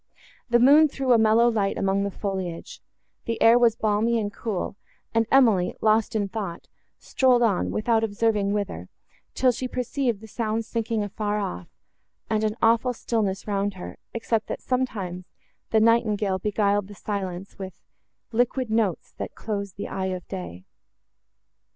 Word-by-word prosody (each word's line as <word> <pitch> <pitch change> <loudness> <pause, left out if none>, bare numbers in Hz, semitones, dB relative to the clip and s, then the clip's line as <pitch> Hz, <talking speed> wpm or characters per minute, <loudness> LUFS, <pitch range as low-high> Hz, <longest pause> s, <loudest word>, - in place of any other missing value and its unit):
The 240 - +5
moon 285 +6 +7
threw 270 -3 +1
a 230 - +5
mellow 220 +2 +5
light 210 -4 0
among 195 0 +1
the 200 - -1
foliage; 190 -4 -5 0.4
the 230 - -2
air 230 +2 +6
was 235 -2 +4
balmy 220 +2 +1
and 205 -1 -3
cool, 215 -5 -3 0.4
and 225 -1 +2
Emily, 225 -10 +4
lost 220 0 +2
in 205 -2 +1
thought, 195 -4 -6 0.3
strolled 250 -2 +2
on, 205 -6 +1
without 225 +1 +1
observing 210 -2 +1
whither, 200 - -3 0.5
till 255 -1 +4
she 255 +2 -4
perceived 250 -2 -2
the 220 - -12
sounds 220 0 -2
sinking 225 -2 -2
afar 205 +1 -2
off, 90 - -4 0.6
and 215 0 +1
an 215 +1 -1
awful 230 +2 +3
stillness 215 -5 -2
round 200 -1 -1
her, 180 - -9
except 225 -1 -1
that, - - -5
sometimes, 200 -9 -2 0.4
the 220 - +3
nightingale 215 -4 +2
beguiled 205 0 +1
the 205 - -11
silence 190 -1 -5
with 190 -1 -7 0.5
Liquid 245 +1 0
notes, 215 -6 0
that - - -5
close 200 -3 -4
the 200 - -6
eye 190 - -3
of 185 -1 -5
day. 90 0 -7
215 Hz, 155 wpm, -25 LUFS, 195-230 Hz, 0.6 s, moon